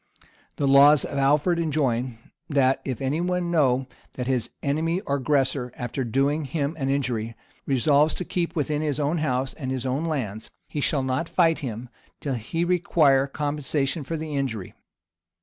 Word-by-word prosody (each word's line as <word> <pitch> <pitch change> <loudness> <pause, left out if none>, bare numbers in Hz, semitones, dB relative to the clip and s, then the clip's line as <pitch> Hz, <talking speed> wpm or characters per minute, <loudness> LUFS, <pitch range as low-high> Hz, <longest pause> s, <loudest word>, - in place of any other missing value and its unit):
The 140 - 0
laws 140 +2 +7
of 140 - -3
Alfred 150 +5 +3
enjoin, 130 -7 0 0.3
that 135 -3 +2
if 130 -3 -4
any 145 +5 0
one 180 -1 -1
know 135 -5 +3 0.3
that 125 - -4
his 125 -3 0
enemy 160 +5 0
or 140 -8 -1
aggressor, 135 -2 0
after 120 +2 -3
doing 140 +6 0
him 145 +2 -2
an 135 -1 -1
injury, 120 -5 -1 0.3
resolves 145 +3 +3
to 180 - -4
keep 175 -2 -2
within 150 -1 0
his 150 -2 -1
own 150 +3 0
house 130 -3 -1
_and 130 -4 -6
his 130 -1 -3
own 135 +5 -1
lands_[*] 115 -9 -3 0.2
he 145 - -4
shall 140 -1 +1
not 130 +5 -1
fight 165 -2 +3
him, 120 -2 -5 0.3
till 140 - -3
he 130 +9 -2
require 155 -6 +3
compensation 145 +1 -1
for 165 +4 -4
the 155 -1 -5
injury. 115 -9 -3
140 Hz, 165 wpm, -25 LUFS, 130-155 Hz, 0.3 s, laws